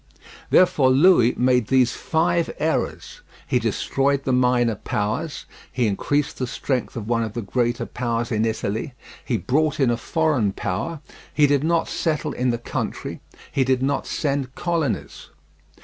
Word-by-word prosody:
Therefore 150 -7 +4
Louis 130 -3 +5
made 125 -3 +2
these 130 -2 +3
five 170 +1 0
errors: 160 +1 -2 0.2
he - - +1
destroyed 140 0 0
the 130 - 0
minor 125 -2 +3
powers, 110 +10 -3 0.3
he 125 -1 0
increased 140 +8 -1
the 130 - -1
strength 130 +1 -2
of 110 -3 -5
one 115 -1 +1
of 110 -2 -3
the 120 - -4
greater 120 +3 -1
powers 120 0 -2
in 110 -1 +1
Italy, 110 +3 -2 0.3
he - - -1
brought 145 - 0
in 130 -4 +3
a 120 - 0
foreign 145 - 0
power, 140 - -3 0.3
he 150 - +4
did 145 -1 +2
not 165 0 +1
settle 155 -2 -1
in 125 +1 0
the 120 - 0
country, 120 - -5 0.3
he 135 - +2
did 130 0 +1
not 140 0 -1
send 135 -3 -2
colonies. 165 -7 -2
130 Hz, 155 wpm, -23 LUFS, 120-150 Hz, 0.3 s, Louis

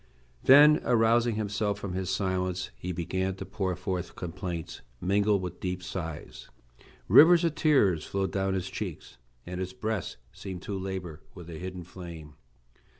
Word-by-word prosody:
Then 150 +3 +7
arousing 115 0 +3
himself 105 -1 -1
from 100 -3 -5
his 95 0 -3
silence 95 -1 -1
he 90 - -5
began 95 +2 -2
to 95 - -7
pour 95 -1 -2
forth 90 -1 -4
complaints, 90 -1 -5 0.2
mingled 100 +2 +2
with 90 0 -6
deep 90 -1 -3
sighs. 80 -5 -6 0.6
Rivers 170 +2 +8
of 165 -3 +1
tears 135 - +3
flowed 95 -1 -2
down 95 0 0
his 95 0 -2
cheeks, - - -6 0.3
and 90 +1 -5
his 95 0 -4
breast 105 - -3 0.2
seemed 95 -2 -7
to 100 - -4
labor 95 -5 -5
with 85 -2 -10
a 80 - -7
hidden 90 -1 -6
flame. 85 -4 -10
95 Hz, 150 wpm, -28 LUFS, 90-100 Hz, 0.6 s, Rivers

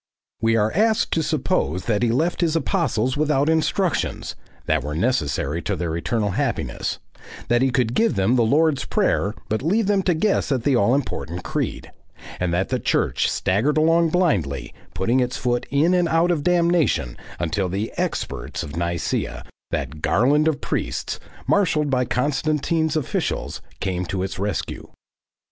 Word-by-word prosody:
We 115 0 +3
are 110 -1 +2
asked 220 +3 +2
to 165 - +1
suppose 95 - -1
that 110 -2 +1
he 120 - +2
left 160 +10 0
his 165 -2 +1
apostles 155 - 0
without 145 -1 +1
instructions, 160 +2 0 0.3
that 80 -3 +1
were 75 +1 -4
necessary 85 - 0
to 100 - -2
their 85 -2 -2
eternal 105 +4 -1
happiness, - - -2 0.5
that 120 +1 +3
he 135 - +3
could 125 -2 +1
give 225 - +2
them 95 +6 +2
the 120 - +3
Lord's 145 +5 +3
Prayer 105 +3 0
but 110 - -1
leave 200 +9 +1
them 200 -1 +2
to 180 -2 +1
guess 190 -2 +1
at 130 -4 0
the 140 0 +3
all 120 +2 +3
important 90 - -3
Creed,* - - -3 0.5
and 90 -1 0
that 90 +3 0
the - - 0
Church - - +1
staggered 120 +12 +1
along 165 +1 +4
blindly, 85 - 0 0.2
putting 115 +7 +1
its 125 -1 0
foot 120 -1 -1
in 150 +6 +3
and 175 -2 +2
out 165 +2 +3
of 155 -4 0
damnation, 170 - +2 0.2
until 90 +3 -1
the 100 +5 -3
"experts" - - -3
of 75 0 -7
Nicaea, 85 0 -2 0.3
that 75 +4 -4
"garland 145 - +3
of 155 -3 0
priests," - - -3 0.3
marshalled 155 -7 +2
by 125 -1 +2
Constantine's 150 +4 0
officials, 145 - -2 0.2
came 90 -2 -2
to 95 -1 -2
its 95 -1 -5
rescue. 100 +1 -3
130 Hz, 160 wpm, -22 LUFS, 95-160 Hz, 0.5 s, along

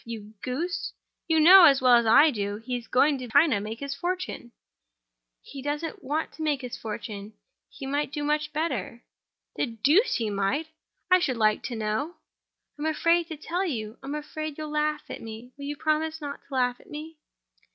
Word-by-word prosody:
You 220 -2 -8
goose! 325 +8 -3 0.3
You 320 -1 +3
know, 360 +3 +10
as 275 -4 +6
well 255 -1 +5
as 235 -1 +5
I 295 +8 +7
do, 205 -4 -3
he 245 +3 -4
is 240 -2 -6
going 280 +2 +3
to 250 - -6
China 285 0 +4
to - - -3
make 220 +4 -6
his 280 0 -3
fortune." 350 -5 -4 0.9
"He 275 - -9
doesn't 300 +6 -4
want 300 +4 -2
to - - -11
make 295 -3 0
his 250 -2 -6
fortune—he 215 - -9
might 285 +1 -1
do 295 -1 -3
much 300 0 0
better." 260 - -3 0.5
"The - - +1
deuce 285 - +3
he 220 -3 -1
might! 200 +11 0 0.5
How, 365 - +8
I - - -2
should 260 -8 -1
like 215 -1 +3
to 240 - -4
know?" 220 +10 -2 0.6
"I'm 305 - -1
afraid 335 +2 +2
to 320 -3 -7
tell 345 +5 -2
you. 225 - -4
I'm 275 +2 -5
afraid 300 0 -5
you'll 305 -1 -5
laugh 300 0 0
at - - -7
me. 225 +3 -9
Will 280 - -8
you 290 +1 -3
promise 315 +1 0
not 285 -2 -6
to 275 - -12
laugh 250 -1 +1
at - - -19
me?" 310 +1 -8
285 Hz, 195 wpm, -27 LUFS, 235-310 Hz, 0.9 s, know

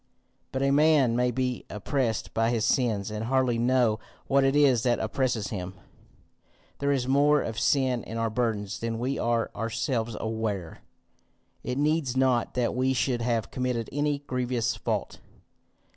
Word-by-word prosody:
"But 135 0 -1
a 135 - +3
man 145 -4 +4
may 125 +1 +2
be 125 0 -2
oppressed 115 +2 -2
by 115 0 +2
his 115 -2 0
sins, 110 -5 +1
and 110 +1 -3
hardly 130 -1 +1
know 120 -2 +2 0.3
what 140 0 +3
it 135 +1 +2
is 135 -5 +4
that 120 -1 +2
oppresses 120 -6 -1
him. 95 -2 -5 1.0
There 140 0 +1
is 130 -3 0
more 145 +2 +4
of 110 -3 -4
sin 130 0 +1
in 115 - -6
our 115 -1 -1
burdens 110 -4 -2
than 115 0 -3
we 130 +4 -2
are 115 -1 0
ourselves 115 0 -2
aware. 110 -6 -3 0.8
It 125 - -3
needs 145 -3 +1
not 130 -3 +2
that 125 -2 +1
we 130 +1 +1
should 125 -1 0
have 115 -1 -1
committed 125 -3 -2
any 145 +1 0
grievous 125 -3 -1
fault. - - -3
125 Hz, 160 wpm, -27 LUFS, 115-130 Hz, 1.0 s, man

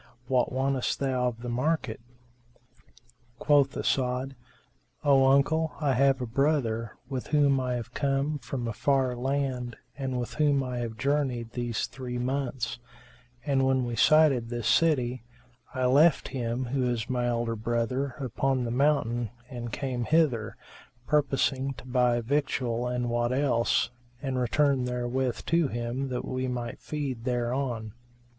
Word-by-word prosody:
What 125 -1 +1
wantest 130 0 0
thou 130 -2 +1
of 120 -1 -5
the - - -4
market?" 125 -1 -1 1.4
Quoth 140 -1 +3
As'ad, 130 +1 0 0.7
"O 135 -2 +5
uncle, 155 +4 +3
I 145 -3 +2
have 135 +1 +3
a - - -1
brother, 115 -3 0
with 130 -2 -4
whom 145 -3 +3
I 125 -1 -1
have 120 -2 -6
come 140 +1 0
from 125 -2 -4
a 115 - -2
far 130 +2 +1
land 130 -2 -2 0.2
and 130 -2 -3
with 120 - -4
whom 145 -3 +2
I 125 -1 -3
have 115 -2 -4
journeyed 130 -4 0
these 120 -2 -2
three 125 -2 -6
months; 130 -1 -2 0.7
and, 135 -2 +2
when 130 -1 +2
we 120 -1 -3
sighted 135 0 +4
this 120 -2 -3
city, 130 -7 +2 0.5
I 130 0 +1
left 145 +5 +4
him, 125 -1 -2
who 125 0 0
is 115 -3 -2
my 125 -1 0
elder 120 -1 -1
brother, 120 +4 -1
upon 135 -1 0
the 115 - -2
mountain 120 -4 +1 0.2
and 120 -2 -5
came 125 -2 -2
hither, 140 -9 +1 0.5
purposing 135 -2 +1
to 125 - -12
buy 125 -1 +2
victual 125 -2 -1
and 125 0 -1
what 120 0 +1
else, 130 -5 +2 0.3
and 130 -1 -2
return 135 +2 +2
therewith 125 0 -2
to 165 -2 +2
him, 120 +3 -3
that 125 -1 -3
we 130 0 -2
might 120 -2 -4
feed 140 -6 -4
thereon." 120 -2 -2
130 Hz, 145 wpm, -28 LUFS, 120-140 Hz, 1.4 s, O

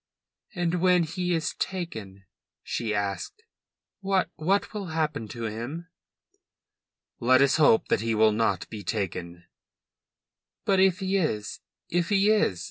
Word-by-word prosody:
"And 175 -1 0
when 180 -1 +4
he 175 +3 -2
is 160 -1 -1
taken," 110 - -5 0.4
she 115 -2 -3
asked, 105 - -3 0.6
"what 195 -1 0
what 190 +8 0
will 205 -3 -4
happen 155 -7 -2
to 115 +2 -7
him?" 120 +11 -5 1.3
"Let 130 +2 +5
us 140 +1 +4
hope 145 -8 +4
that - - +2
he 115 0 0
will 110 0 +5
not 110 +1 0
be 105 -2 -7
taken." 90 -5 -4 1.2
"But 195 -1 +3
if 190 +1 +3
he 190 +1 +1
is 110 - -2 0.3
if 175 0 0
he 205 +1 +4
is?" 155 - +2
155 Hz, 135 wpm, -26 LUFS, 110-185 Hz, 1.3 s, Let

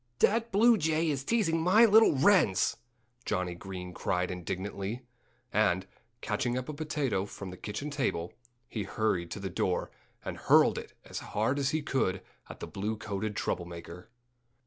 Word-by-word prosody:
"That 230 +2 +2
blue 225 +2 +5
jay 160 0 +1
is 135 -2 -2
teasing 165 -5 +1
my 195 +7 +6
little 220 -5 +6
wrens!" 150 - +4 0.5
Johnnie 90 -4 -1
Green 90 0 -7
cried 90 +1 -1
indignantly. 95 +5 -4 0.5
And, 95 -3 +2 0.4
catching 120 0 -1
up 130 - -4
a 155 - -4
potato 145 - -1
from 100 -2 -8
the - - -8
kitchen 105 +10 -5
table, 110 - -1 0.3
he 110 - -4
hurried 95 -4 -1
to - - -5
the 95 -2 -4
door 90 0 -1 0.3
and - - -4
hurled - - +4
it - - -11
as - - -5
hard 115 +7 -1
as 135 -1 +1
he 155 +1 -1
could 100 -10 0 0.3
at - - -10
the - - -3
blue 105 +3 -3
coated 105 0 -4
trouble 90 -3 -2
maker. 85 +2 -10
110 Hz, 165 wpm, -30 LUFS, 95-155 Hz, 0.5 s, my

